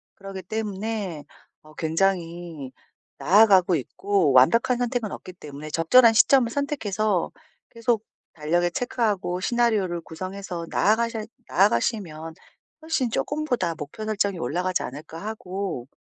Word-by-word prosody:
그러기 195 -1 -8
때문에 205 -5 -4 0.4
어 155 0 -17
굉장히 165 -4 -1 0.5
나아가고 190 -3 +5
있고 185 +3 0
완벽한 230 - +5
선택은 245 -3 -2
없기 185 - -8
때문에 150 -3 -9
'적절한 225 +9 +6
시점을 240 +1 +5
선택해서 215 - -1 0.4
계속 230 -1 -1 0.3
달력에 175 +3 0
체크하고 210 -5 -1
시나리오를 210 -7 +1
구성해서 185 +1 -6
나아가셔 225 +1 +1 0.2
나아가시면 165 - 0 0.5
훨씬 315 -6 -1
쪼끔보다 245 - -1
목표 155 +9 -7
설정이 200 -3 0
올라가지 180 +7 -1
않을까?' 155 +6 -8
하고 190 - -5
195 Hz, 315 characters per minute, -24 LUFS, 165-225 Hz, 0.5 s, 적절한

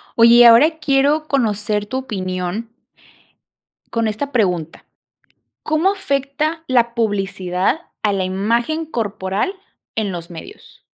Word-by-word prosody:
Oye, 230 0 +7
y 240 - +8
ahora 250 +8 +6
quiero 295 +1 +2
conocer 210 -6 0
tu 260 - -3
opinión 190 -3 -4 1.2
con 230 -1 0
esta 220 +7 -3
pregunta: 180 - -1 0.8
¿cómo 310 +5 +2
afecta 300 -2 -2
la 235 -2 +2
publicidad 195 - -1 0.2
a 205 - +2
la 195 -1 0
imagen 235 - -1
corporal 210 - -2 0.4
en 210 -3 -1
los 170 -1 -7
medios? 180 - -13
230 Hz, 115 wpm, -19 LUFS, 195-280 Hz, 1.2 s, y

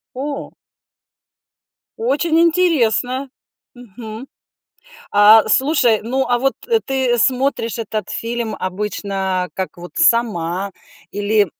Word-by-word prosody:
О! 280 +1 -5 1.5
Очень 295 +7 +1
интересно! 280 -7 +2 0.5
Мгм. 230 0 -10 0.9
А, 210 +2 +7
слушай, 260 -4 +3
ну, 260 +4 -1
а 245 -1 +2
вот 270 +1 +1 0.3
ты 260 -3 0
смотришь 255 -2 0
этот 215 -2 -4
фильм 230 -1 -3
обычно 190 -1 -3
как 190 -1 -4
вот 175 +1 -10
сама? 200 - +1 0.4
Или 205 -2 +1
230 Hz, 95 wpm, -18 LUFS, 205-265 Hz, 1.5 s, А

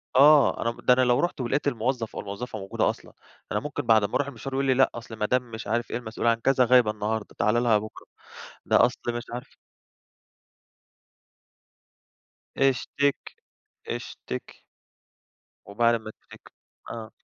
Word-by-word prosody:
آه، 145 +1 +7
ده - - -7
أنا 115 - 0
م - - -14
ده 125 - +5
أنا 130 - +3
لو 125 -1 +3
رُحت 175 -6 -1
ولقيت 140 +4 -1
الموظف 120 -2 -2
أو - - -3
الموظفة 105 +2 -6
موجودة 95 0 0
أصلًا، - - -7 0.4
أنا - - +1
ممكن 145 0 -5
بعد 110 -3 +4
ما 100 - -4
أروح 145 - +1
المشوار 135 +1 -7
يقول 135 0 0
لي 130 - +3
لأ، 135 +1 +4
أصل 115 -1 -8
مدام 125 +2 0
مش 110 -2 -7
عارف 120 +2 -1
إيه - - -1
المسئولة 115 0 -2
عن 115 - +4
كذا 130 +1 +3
غايبة 120 -3 +5
النهارده، 105 0 -4
تعالَ 120 +1 +2
لها 115 -3 +4
بُكره، 110 +1 -8 0.6
ده - - +5
أصل - - -3
مش 120 0 -3
عارف 125 - -8 3.0
اشتكي، 135 +1 0 0.5
اشتكي. - - -7 1.0
وبعد 115 +3 +2
أمّا 110 -1 -5
تشتكي؟ - - -17 0.4
آه. 110 -2 -7
120 Hz, 160 wpm, -26 LUFS, 110-130 Hz, 3.0 s, آه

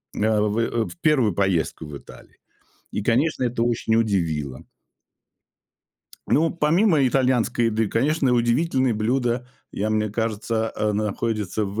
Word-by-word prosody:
э, - - -5
в 110 +1 +1
в - - -12
первую 130 - +3
поездку 85 -5 -1
в 75 -1 -8
Италию. - - -16 0.6
И, - - -2
конечно, 130 +6 +1
это 120 -1 0
очень 115 -1 0
удивило. 80 - -1 1.7
Ну, 160 +2 +3
помимо 165 -1 +3
итальянской 125 -2 +1
еды, 110 -1 0
конечно, 135 +3 +1
удивительные 125 +2 +1
блюда, 120 +2 0 0.2
я 105 +2 -2
мне 110 0 +1
кажется, 110 +1 -2
а 105 0 0
находятся 105 0 -2
в, 100 +2 -4
115 Hz, 125 wpm, -23 LUFS, 105-130 Hz, 1.7 s, первую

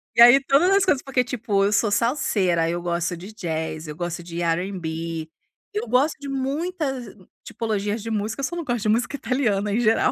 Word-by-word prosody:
E 235 - +5
aí 255 +3 +9
todas 280 +7 +4
as 395 - +4
coisas 285 -7 +2
porque, 265 -2 0
tipo, 225 -5 0
eu 200 - +2
sou 210 0 +2
salseira, 200 - +1
eu 175 +1 -2
gosto 175 0 -1
de 190 +5 -10
jazz, 160 -4 -4
eu 150 - -6
gosto 175 0 -4
de 170 0 -6
R&B. 165 -2 -2 0.4
Eu 225 +3 -2
gosto 260 +6 +2
de 285 - -7
muitas 275 - -3 0.3
tipologias 210 -1 -2
de 225 - -4
música, 220 +5 -2
só 340 - -2
não 335 - -4
gosto 240 -3 -1
de 215 - +1
música 240 +6 +1
italiana 220 -7 0
em 225 - +1
geral. 225 -1 +3
215 Hz, 195 wpm, -23 LUFS, 175-260 Hz, 0.4 s, aí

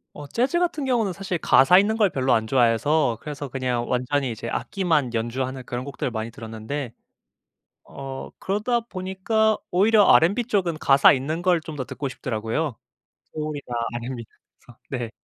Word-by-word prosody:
어 145 -1 -8
재즈 255 - 0
같은 335 -5 -1
경우는 235 -6 +1
사실 190 -1 -4
가사 155 +5 +6
있는 215 +3 +1
걸 210 -4 +3
별로 130 -1 +1
안 110 -1 +2
좋아해서 120 +2 +2
그래서 145 -2 -6
그냥 125 -2 -2
완전히 125 +1 0
이제 115 +1 -6
악기만 160 - 0
연주하는 130 +3 -3
그런 120 +1 -4
곡들 140 -2 -4
많이 110 0 -4
들었는데 115 +3 -6 0.9
어 135 -1 -8
그러다 215 +5 0
보니까 215 +1 0
오히려 205 +3 +5
알앤비 205 +9 +4
쪽은 180 -8 0
가사 140 -1 +6
있는 145 +5 -2
걸 175 -2 +3
좀 155 -1 -8
더 130 - -3
듣고 140 +2 -5
싶더라고요. 120 +3 -3 0.6
소울이나 150 -2 -4 0.3
알앤비. 120 0 -5 0.4
그래서 120 - -18 0.3
네. - - -9
145 Hz, 350 characters per minute, -24 LUFS, 125-190 Hz, 0.9 s, 가사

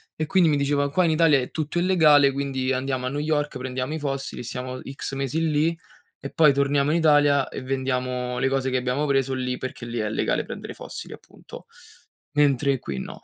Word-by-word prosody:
e 155 - -2
quindi 180 -3 +4
mi 145 - +2
dicevano: 140 0 +1
“Qua 185 +5 +2
in 165 - +2
Italia 155 -3 +4
è 125 - -5
tutto 155 +2 -2
illegale, 155 -6 +5
quindi 135 -1 -2
andiamo 130 0 -2
a - - -1
New 145 +2 -3
York, 150 -1 -1
prendiamo 130 +2 -4
i 160 - -3
fossili, 135 -3 -4
siamo 125 +2 -5
X 135 0 -7
mesi 145 +4 -1
lì 160 +3 +1 0.4
e - - -5
poi 155 -4 +5
torniamo 140 +1 +1
in 165 - +2
Italia 145 -3 +4
e - - -6
vendiamo 125 -1 -2
le 135 +1 +1
cose 135 -1 0
che 130 - -2
abbiamo 125 +4 -1
preso 135 -2 +1
lì, 125 -1 -2
perché 130 -2 -6
lì 120 0 -4
è 110 - -1
legale 110 - 0
prendere - - -7
i - - -22
fossili, - - -8
appunto. - - -13 0.7
Mentre 140 -2 +2
qui 70 - -5
no.” - - -8
140 Hz, 210 wpm, -24 LUFS, 130-150 Hz, 0.7 s, illegale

